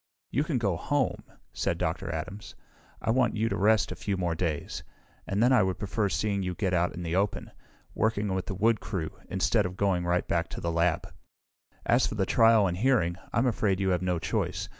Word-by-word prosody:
"You 140 - +1
can 150 -4 -1
go 100 -7 0
home," 145 - -1 0.3
said - - -1
Dr. - - -2
Adams. 95 +6 -6 0.5
"I - - +2
want 125 -1 +2
you 110 +1 +1
to - - -1
rest 110 +2 +3
a - - -4
few 100 -2 -2
more 90 -2 0
days, 80 -3 -3 0.5
and 100 +3 +1
then 125 +2 +5
I 125 - +6
would 95 -1 0
prefer 105 0 -1
seeing 100 +3 0
you 90 -1 -3
get 95 -2 -1
out 90 0 +1
in 90 - -5
the 85 0 -2
open, 100 +1 -1 0.4
working 105 -3 0
with 95 -1 -2
the 95 - -3
wood 110 +3 +2
crew, 80 -5 -4 0.2
instead 95 +2 +2
of 90 +1 -9
going 95 -3 +1
right 90 0 0
back 85 -1 0
to - - -7
the 85 - -2
lab. 85 0 0 0.7
"As 120 +2 +3
for - - -4
the 95 -2 +1
trial 115 -1 +5
and 90 -2 -1
hearing, 105 -7 +2 0.2
I'm 115 - +2
afraid 105 -6 +1
you 95 -1 +1
have 90 -1 +1
no 90 -1 0
choice. 80 - -2
95 Hz, 215 wpm, -28 LUFS, 90-110 Hz, 0.7 s, I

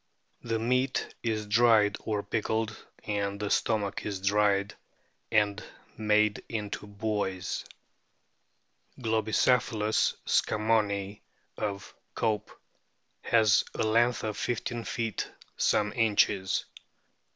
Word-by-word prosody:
The 115 -1 -1
meat 125 +3 0
is 110 -2 -1
dried 105 -1 +4
or 105 -2 -2
pickled, 110 0 -1 0.3
and 100 -1 -2
the 105 -1 -3
stomach 105 -3 0
is 100 -2 -3
dried 100 0 +2 0.6
and 105 -2 +2 0.3
made 105 -1 +2
into 105 -2 -4
buoys.* 100 -2 -2 1.4
Globicephalus 110 -1 +2
scammonii, 105 -2 +1 0.3
of 100 -2 -4 0.2
Cope,f 110 -2 -1 0.7
has 110 -4 +5
a - - 0
length 120 +2 +2
of 110 -1 -3
1 120 0 -2
5 - - -7
feet 115 -3 -3 0.2
some 105 0 +1
inches. 105 -4 +2
105 Hz, 95 wpm, -29 LUFS, 105-115 Hz, 1.4 s, has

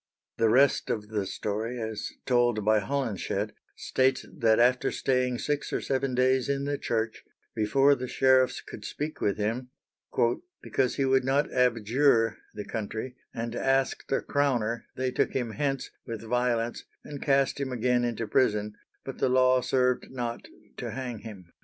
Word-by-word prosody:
The 115 - +4
rest 135 +4 +4
of 105 -2 -2
the 105 -3 -2
story, 110 +6 -3
as 110 -2 -4
told 120 -4 +2
by 110 0 +4
Holinshed, 115 -1 -2 0.2
states 130 0 +1
that 110 -2 +3
after 125 +2 +3
staying 125 -1 0
six 145 +3 -2
or - - 0
seven 135 -1 -1
days 130 +1 +2
in 140 0 0
the 145 0 -2
church, 110 -1 -2 0.3
before 135 +6 +4
the 130 -2 -3
sheriffs 130 0 +3
could 105 - -10
speak 150 +8 -5
with 100 - +1
him, 115 +5 -2 0.9
"because 130 -2 0
he 135 - +1
would 130 0 +3
not 135 +3 +1
abjure 115 -1 +3 0.2
(the 105 - -5
country) 110 +3 -4 0.2
and 115 0 -4
asked 135 +1 0
a 135 - +2
crowner, 120 -5 0
they 130 0 -1
took - - 0
him 120 -4 -1
hence, 135 +1 -2 0.2
with 115 -2 -5
violence, 120 0 0 0.2
and 145 -2 -8
cast 135 -1 +2
him 135 -2 -2
again 125 0 +1
into 115 -1 -1
prison, 105 -2 +1 0.3
but - - -7
the - - +2
law 130 0 +4
served 125 0 +1
not 120 -2 -4 0.3
to - - -4
hang 125 -4 -5
him." 95 -6 -11
125 Hz, 160 wpm, -28 LUFS, 110-130 Hz, 0.9 s, The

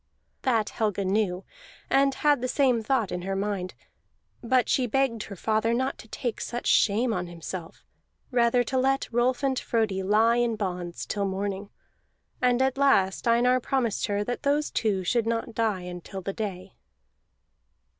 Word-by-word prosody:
That 225 -5 +1
Helga 205 -3 -1
knew, 190 -2 0 0.4
and 275 0 +3
had 290 -3 +2
the 255 - -1
same 255 -3 +2
thought 225 -3 0
in 180 - -3
her 195 +2 -3
mind; 195 -2 -3 0.7
but 250 +1 +2
she 255 -2 +2
begged 240 -2 +1
her 200 - -8
father 220 +4 +1
not 260 +2 -1
to - - -12
take 235 +1 -4
such 240 0 -4
shame 225 +3 +3
on 180 -3 -2
himself, 170 0 -8 0.5
rather 245 0 +3
to 260 +2 -1
let 270 +1 +1
Rolf 245 +3 +1
and 265 -2 +1
Frodi 215 -5 0
lie 220 +4 +3
in 240 -2 +1
bonds 180 -4 -4
till 200 -1 -2
morning. 195 +1 -3 0.7
And 250 0 +3
at 265 0 0
last 200 -8 +3
Einar 245 +2 +4
promised 245 -4 -1
her 205 0 0
that 245 +3 -4
those 290 +1 +1
two 200 -4 0
should 230 +5 +1
not 230 0 -2
die 220 -4 0
until 180 +1 -7
the 195 - -3
day. 195 -3 -5
225 Hz, 165 wpm, -26 LUFS, 195-250 Hz, 0.7 s, Einar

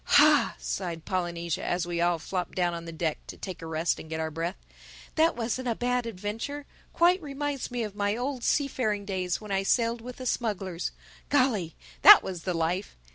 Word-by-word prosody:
"Ha!" - - +6
sighed 60 - -4
Polynesia, 170 -3 -2
as 175 -1 0
we 170 -1 -2
all 175 0 +3
flopped 180 +2 -4
down 175 -2 +1
on 170 0 -6
the 165 - -6
deck 160 -1 -2
to - - -8
take 185 -3 -7
a 165 - -6
rest 160 +1 0
and 160 - -10
get 160 0 -3
our 160 0 -2
breath. 165 +4 -3 0.6
"That 325 +1 +3
wasn't 245 +2 -2
a 230 - +1
bad 245 0 0
adventure—quite 280 - -1
reminds 290 -2 -3
me 245 -1 -2
of 210 -2 -5
my 205 +1 0
old 255 0 -3
seafaring 235 -8 0
days 185 -3 -1
when 210 -2 -9
I 195 0 +2
sailed 230 +3 +1
with 250 +1 -8
the 255 - -8
smugglers—Golly, 205 - -1 0.3
that 415 - +11
was 180 -3 -5
the 180 -2 0
life! 170 +4 -1
195 Hz, 185 wpm, -28 LUFS, 170-245 Hz, 0.6 s, that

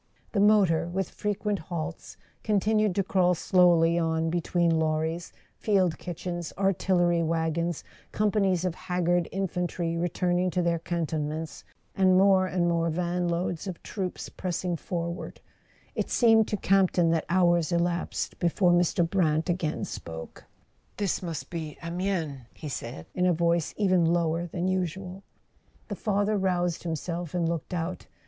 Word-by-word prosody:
The 205 - 0
motor, 200 -6 +4
with 185 +2 -3
frequent 210 -1 -2
halts, 165 -1 -6 0.3
continued 215 -1 +2
to 195 - +2
crawl 180 -1 +2
slowly 170 -2 +4
on 160 -1 0
between 170 -1 +1
lorries, 160 +2 -1 0.3
field 185 -6 +2
kitchens, 175 0 -5
artillery 180 -3 +2
wagons, 165 0 -1 0.3
companies 195 -4 +1
of 180 - 0
haggard 175 -1 0
infantry 180 -3 -2
returning 175 +1 0
to 180 +1 0
their 170 -1 +1
cantonments, 160 -2 -3 0.3
and 185 -1 +4
more 190 -1 +5
and 180 -1 0
more 170 -1 +1
vanloads 175 +1 -1
of 180 -3 -6
troops 190 -3 -4
pressing 180 -1 -3
forward; 170 +1 -5 0.5
it - - -2
seemed 225 -2 +4
to 210 - -1
Campton 185 -3 +3
that 165 -1 0
hours 175 -1 +3
elapsed 170 0 -1
before 175 +1 +3
Mr. 175 -1 +3
Brant 165 -2 +1
again 170 -3 -2
spoke. 80 -1 -8 0.5
"This 200 -2 -1
must 170 -4 -5
be 160 -3 -5
Amiens," 170 -4 -2 0.2
he 155 - -7
said, 115 - -6
in 180 0 +1
a 180 - +4
voice 170 -1 +1
even 185 -4 +3
lower 170 0 +1
than 175 +2 -2
usual. 185 +1 -2 0.7
The - - -3
father 205 0 0
roused 180 -3 0
himself 170 0 -4
and 170 -2 +1
looked 165 -2 -3
out. 175 +2 -4
175 Hz, 140 wpm, -27 LUFS, 165-185 Hz, 0.7 s, more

